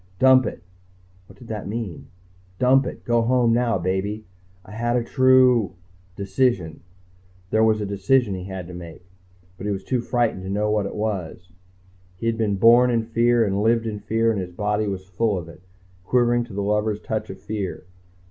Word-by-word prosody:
Dump 130 -1 +5
it.... 85 - -7 0.6
What 95 - -17
did 115 - -14
that 105 -3 -5
mean? 105 -4 -5 0.5
Dump 130 +1 +4
it... - - -8
go 120 -1 +2
home 120 0 +2
now, 120 -2 +1
baby... 95 +4 -2 0.4
I 95 - -13
had 120 +3 -1
a 120 - +1
true... 130 -5 +4 0.4
Decision... 95 - -1 0.7
there 110 - +3
was 110 -1 +3
a - - -2
decision 100 +3 +1
he 90 -1 -6
had 95 -2 -6
to 90 - -10
make, 85 0 -10 0.5
but 100 - -5
he - - 0
was 95 -1 -4
too 125 -2 -1
frightened 120 -5 0
to 95 - -7
know 105 +2 0
what 105 -2 0
it - - -8
was. 95 -4 -4 0.6
He 90 - -7
had 115 0 +1
been 105 -3 +1
born 120 +5 +6
in 115 -2 +1
fear 115 +1 +2
and 100 0 -1
lived 115 +1 +2
in 105 -2 -4
fear 115 +2 +1
and 105 -3 -2
his 90 -1 -7
body 105 +2 -1
was 95 -2 -4
full 100 +2 0
of 85 -2 -6
it, 85 - -14 0.4
quivering 120 +2 +2
to 115 - -13
the 100 - -2
lover's 105 +1 0
touch 110 0 -4
of 95 0 -8
fear. 100 -2 -5
110 Hz, 195 wpm, -23 LUFS, 95-120 Hz, 0.7 s, born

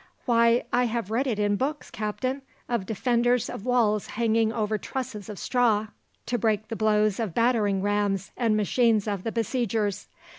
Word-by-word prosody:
"Why, 235 -1 +4
I 245 +1 +3
have 230 -3 -3
read 255 +5 +1
in 205 -3 +1
books, 295 +5 -3
captain, 255 +6 -3 0.3
of 235 -6 -2
defenders 240 +2 +1
of 205 - -7
walls 220 -4 +2
hanging 225 -1 +1
over 215 -1 -1
trusses 240 -6 -5
of 210 - -7
straw, 220 -3 +1 0.4
to 240 0 -1
break 215 -1 0
the 225 - -3
blows 215 -1 +2
of 215 -7 -3
battering 215 -5 +2
rams 205 -2 0
and 225 -3 +1
machines 220 0 +2
of 200 -3 -2
the 225 - -2
besiegers. 225 -3 -1
220 Hz, 160 wpm, -26 LUFS, 210-240 Hz, 0.4 s, Why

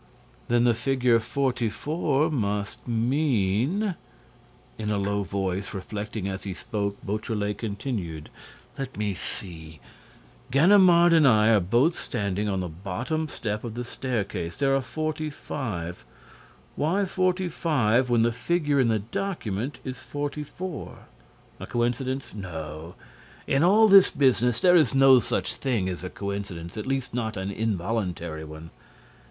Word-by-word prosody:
"Then 120 0 +3
the 120 -1 +4
figure 125 0 +2
44 140 +5 0
must 105 -6 -2
mean—" 125 - +1 0.9
In 105 -1 -2
a 105 - +1
low 100 +1 0
voice, 95 0 -3
reflecting 100 +1 -4
as 95 -1 -4
he 95 -2 -5
spoke, 100 -2 -3
Beautrelet 105 -1 -2
continued: 100 - -4 0.5
"Let 135 -1 -5
me 105 -1 -1
see—Ganimard 135 - +1
and 160 -3 +6
I 110 -3 +5
are 110 -2 +5
both 120 - +2
standing 100 0 -2
on 95 -2 -1
the 90 - -3
bottom 100 - -3
step 105 -7 -4
of 115 -2 -6
the 120 - -3
staircase—there 120 0 -1
are 135 - +1
45. 135 - -4 0.7
Why 185 +7 +1
45, 165 - +1
when 120 -2 +4
the 120 - +3
figure 145 +3 0
in 130 - +4
the 110 -1 +2
document 120 - -3
is 130 -1 -5
44? 145 +5 -5 0.6
A - - -7
coincidence? 125 +3 -1
No. 80 -4 -7 0.5
In 135 - +2
all 210 +5 +6
this 195 -2 +8
business, 125 -4 +2
there 180 -1 +6
is 150 -6 +4
no 135 -1 +7
such - - -1
thing 120 -9 0
as 90 -1 -4
a 90 - -4
coincidence, 100 -4 -5
at 110 - -5
least 135 -3 -2
not 110 -3 -2
an 95 +1 -3
involuntary 95 -6 -2
one. 80 +1 -10
115 Hz, 130 wpm, -26 LUFS, 100-140 Hz, 0.9 s, this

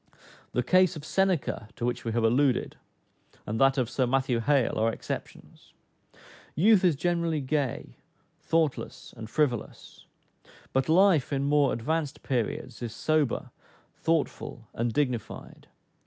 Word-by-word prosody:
The 125 - +1
case 185 +5 +4
of 155 -1 -8
Seneca 185 - 0
(to 120 - -3
which 120 - -2
we 115 - -2
have 115 0 0
alluded,) 125 +3 +2 0.7
and 110 +4 -3
that 135 +1 +4
of 125 -3 +1
Sir 130 +1 0
Matthew 130 -1 +1
Hale, 130 -1 +1
are 115 +1 +2
exceptions. - - -8 0.8
Youth 200 +4 +5
is 175 -5 +4
generally 170 0 0
gay, 140 -2 -2 0.4
thoughtless, 160 -4 -2
and 110 -2 -8
frivolous; 125 -2 -2 0.7
but 135 +2 +1
life, 175 -4 +4
in 140 -1 0
more 145 0 +3
advanced 150 +4 -2
periods, 125 -1 -3
is 115 -2 -5
sober, 155 -5 0 0.4
thoughtful, 155 -7 -2
and 115 +1 -1
dignified. 125 -5 -3
135 Hz, 130 wpm, -27 LUFS, 120-160 Hz, 0.8 s, Youth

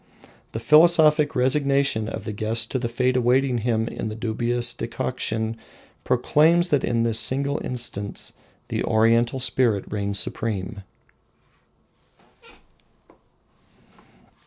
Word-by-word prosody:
The 115 - -3
philosophic 150 +1 +4
resignation 135 -3 +1
of - - -6
the 110 - -5
guest 110 +2 -2
to 130 - -1
the 120 - -2
fate 125 +2 0
awaiting 125 0 +2
him 115 0 -1
in 110 - -5
the 110 - -6
dubious 120 +2 -1
decoction 110 -2 -3 0.5
proclaims 170 +4 +2
that 145 -4 +1
in 115 -1 0
this 115 -1 +1
single 140 +4 0
instance 115 -5 -5 0.4
the - - -2
Oriental 115 +3 +2
spirit 120 -5 +1
reigns 100 -1 -1
supreme. 100 -1 -2
120 Hz, 110 wpm, -23 LUFS, 110-135 Hz, 0.5 s, philosophic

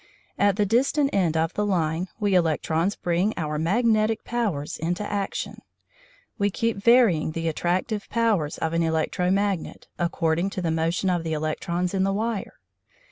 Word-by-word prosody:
At 200 -1 +4
the 205 0 +2
distant 275 +6 +2
end 175 -5 +2
of 160 +2 0
the 210 - -1
line 175 -3 0
we 205 -2 +1
electrons 165 +1 +1
bring 180 +5 0
our 150 -2 -2
magnetic 215 +5 +2
powers 205 -12 -2
into 175 +5 -2
action. 200 -1 -3 0.8
We 200 0 +2
keep 230 +2 -1
varying 200 -8 +4
the 165 0 -2
attractive 180 +6 -1
powers 215 -10 +1
of 160 0 -2
an 165 - +1
electro 165 +2 0
magnet, 195 -2 -1
according 170 +1 0
to - - 0
the 165 - 0
motion 165 +4 0
of 175 -2 0
the 160 -1 -2
electrons 170 +4 -2
in 190 - +1
the 195 +1 +1
wire. 220 0 -2
180 Hz, 160 wpm, -25 LUFS, 165-205 Hz, 0.8 s, At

